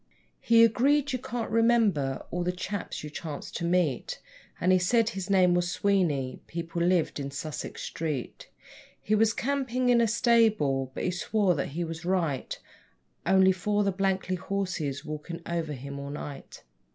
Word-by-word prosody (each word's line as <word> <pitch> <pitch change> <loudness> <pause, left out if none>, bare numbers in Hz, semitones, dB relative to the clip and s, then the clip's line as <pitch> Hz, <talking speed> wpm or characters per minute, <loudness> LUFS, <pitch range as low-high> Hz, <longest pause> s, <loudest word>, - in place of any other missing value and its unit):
He 230 0 +5
agreed: 275 +5 +3
'Yer 255 - -1
can't 245 -3 -4
remember 220 - +2
all 175 0 -1
the 180 - 0
chaps 185 0 -5
yer 150 - -6
chance 150 -1 -6
to 170 - -5
meet,' 170 -7 0 0.4
And 180 - +2
he 185 - +5
said 225 +5 +2
his 195 -2 -5
name 185 -2 +4
was 175 0 +1
Sweeney 175 -10 0
people 170 0 -4
lived 175 -3 +2
in 140 -1 -4
Sussex 145 +2 -6
street. 150 -6 -4 0.5
He 215 - -2
was 215 +1 +4
campin' 255 0 -1
in 240 -1 +5
a 230 - +3
stable, 215 - +2
but - - -3
he 180 - +1
swore 190 +1 +1
that 145 - -2
he 175 - 0
was 165 0 -6
right, 170 -7 -1 0.7
'Only 190 0 +6
for 205 +3 0
the 200 - +1
blanky 190 -1 0
horses 175 -6 -3
walkin' 160 +3 -6
over 165 -3 -2
him 140 +1 -7
all 140 0 -6
night.' 145 -1 -8
180 Hz, 165 wpm, -28 LUFS, 155-215 Hz, 0.7 s, Only